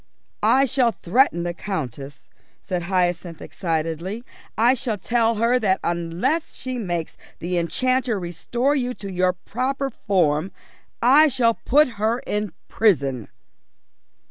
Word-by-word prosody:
"I 270 +1 +4
shall 260 -2 +2
threaten 190 -3 +2
the 175 0 -2
Countess," 145 - -6 0.4
said 180 -3 -2
Hyacinth 175 -2 -1
excitedly. 165 +5 -3 0.3
"I 235 +4 +5
shall 240 -4 -2
tell 230 +3 +1
her 235 +3 +2
that 195 -4 +1
unless 175 - -1
she 255 -1 -5
makes 175 -6 -3 0.2
the 175 +1 -1
enchanter 250 +5 0
restore 235 - -1
you 250 -2 -1
to 200 -1 -7
your 180 0 +1
proper 265 +8 -3
form, 180 -6 0 0.5
I 285 +6 +7
shall 245 -4 +2
put 295 +6 +3
her 225 +2 +2
in 210 -2 -2 0.2
prison." 140 - +1
205 Hz, 125 wpm, -23 LUFS, 175-250 Hz, 0.5 s, I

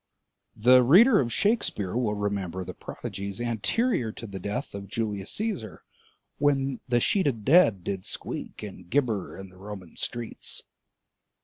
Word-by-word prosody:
The 125 +4 +6
reader 200 - +7
of 120 -3 0
Shakespeare 160 - +1
will 115 -4 +1
remember 100 -3 -2
the - - -6
prodigies 100 +1 -6
anterior 120 - 0
to - - -8
the 100 -3 -7
death 105 +9 -4
of 100 0 -6
Julius 105 -2 -3
Cæsar 195 - -3 0.6
when— 135 -3 +1
"The 120 -1 +4
sheeted 135 - +1
dead 125 - +5
Did 95 0 -4
squeak - - -5
and 90 -4 -9
gibber 115 -8 0
in 95 0 -9
the 90 - -18
Roman 95 -3 -9
streets." 120 -2 -4
110 Hz, 140 wpm, -27 LUFS, 100-135 Hz, 0.6 s, reader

